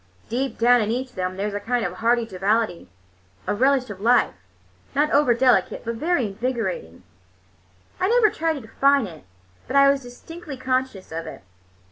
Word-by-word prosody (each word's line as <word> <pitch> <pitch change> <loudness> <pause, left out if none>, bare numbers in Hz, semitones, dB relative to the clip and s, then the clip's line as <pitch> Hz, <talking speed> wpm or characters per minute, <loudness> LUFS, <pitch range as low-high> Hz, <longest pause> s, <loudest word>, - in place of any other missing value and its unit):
Deep 260 +3 -2
down 245 +1 +5
in 210 - -1
each 255 +3 -2
of - - -25
them 185 0 -3
there 200 - -2
was 210 - -3
a 205 - -2
kind 240 +3 -1
of 180 - -3
hearty 230 +3 +1
joviality, 200 - -1 0.6
a - - 0
relish 260 +3 +2
of 195 -1 -9
life, 240 +1 +3 0.6
not 295 +2 +2
over 280 -5 +4
delicate, 250 0 +2
but 230 - -2
very 305 +2 0
invigorating. 200 - -4 1.0
I 370 - +2
never 460 -3 +4
tried 325 0 -1
to 285 - -6
define 275 +3 +2
it, 165 - -11 0.4
but 265 - -4
I 275 0 +7
was 280 -1 -2
distinctly 280 +4 -10
conscious 255 -7 -2
of 165 +1 -5
it. - - -9
245 Hz, 180 wpm, -23 LUFS, 205-275 Hz, 1.0 s, I